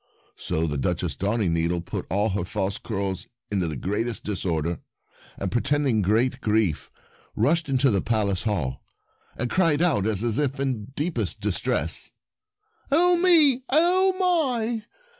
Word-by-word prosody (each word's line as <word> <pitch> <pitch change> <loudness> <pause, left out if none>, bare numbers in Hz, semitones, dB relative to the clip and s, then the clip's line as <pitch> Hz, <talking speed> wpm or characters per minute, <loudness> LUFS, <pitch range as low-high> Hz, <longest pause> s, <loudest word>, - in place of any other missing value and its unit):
So 80 +1 -2
the 75 -3 -2
Duchess - - -1
Darningneedle 90 -5 0
put - - -5
all 105 +4 +1
her 100 -1 -1
false 100 +1 -3
curls 100 -3 -3 0.2
into 95 -4 0
the 80 - -4
greatest 105 - -2
disorder, 85 -5 -2 0.6
and 95 - -3
pretending 135 -2 +1
great 115 +7 +1
grief 105 - 0 0.5
rushed 165 +1 +1
into 135 -1 +3
the 100 -3 +1
Palace 100 -5 0
hall, 80 -11 -2 0.6
and 125 - -1
cried 165 -1 +2
out 135 - +2
as 110 +3 +1
if 140 -2 -1
in 135 -1 +1
the 115 - -6 0.2
deepest 160 +4 -2
distress: - - 0 0.8
"Oh, 350 +5 +4
me!— 320 -8 +5
oh, 365 +6 +3
my! 250 - +1
115 Hz, 140 wpm, -25 LUFS, -, 0.8 s, me